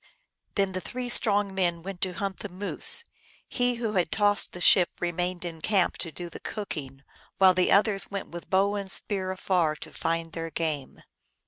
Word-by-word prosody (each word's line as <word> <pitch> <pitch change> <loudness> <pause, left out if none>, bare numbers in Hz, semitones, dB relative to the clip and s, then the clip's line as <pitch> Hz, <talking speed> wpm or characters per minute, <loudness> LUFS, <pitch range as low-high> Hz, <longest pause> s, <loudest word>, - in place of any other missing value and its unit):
Then 195 -2 +1
the 185 0 -4
three 250 +3 -5
strong 205 -4 +5
men 175 -3 0
went 190 -1 -7
to 185 -1 -1
hunt 195 +1 -4
the 205 - -6
moose. 200 - +1 0.4
He 245 -1 0
who 230 -2 -3
had 180 -5 0
tossed 205 -1 +3
the 180 - -9
ship 180 0 +5
remained 175 +1 -2
in 165 -2 -6
camp 195 0 +1
to 170 - -3
do 175 +3 -6
the 170 - -10
cooking, 140 -10 -6 0.3
while 190 -1 +6
the 185 0 +2
others 200 0 +3
went 200 -1 -5
with 170 0 -9
bow 195 +2 +2
and 200 -2 -4
spear 190 -1 0
afar 180 -4 0
to - - -11
find 165 -1 -2
their 165 0 -4
game. 155 -4 -3
185 Hz, 190 wpm, -27 LUFS, 170-200 Hz, 0.4 s, while